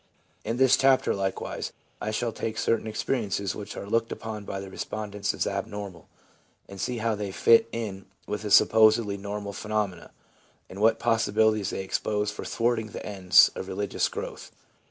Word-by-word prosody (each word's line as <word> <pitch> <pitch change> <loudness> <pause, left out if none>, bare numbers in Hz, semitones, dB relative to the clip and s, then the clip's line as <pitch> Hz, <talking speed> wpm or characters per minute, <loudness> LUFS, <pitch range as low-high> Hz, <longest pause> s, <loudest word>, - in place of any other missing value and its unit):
In 115 +2 -2
this 130 0 +5
chapter, 135 -1 +4
likewise, 95 -1 -3 0.3
I 105 - -2
shall 115 +2 -1
take 110 0 -4
certain 115 -1 0
experiences 105 -3 -1
which 105 - -8
are - - -5
looked 115 +3 0
upon 110 -2 -6
by 95 - -4
the 95 - -7
respondents 105 0 -3
as - - -1
abnormal, 100 -5 -5 0.6
and 100 -1 -8
see 125 +3 -2
how 115 0 0
they 105 -2 -4
fit 115 +3 +5
in 100 -5 -5 0.2
with 105 0 -4
the 105 - -4
supposedly 110 0 +5
normal 100 0 -5
phenomena, 105 -4 -3 0.6
and 95 +2 -7
what 110 +1 +4
possibilities 110 -3 +2
they - - -3
expose 105 +2 -1
for 105 - -7
thwarting 115 -1 0
the - - -6
ends 95 -5 +5
of - - -6
religious 100 +1 -1
growth. - - -7
105 Hz, 165 wpm, -27 LUFS, 100-115 Hz, 0.6 s, this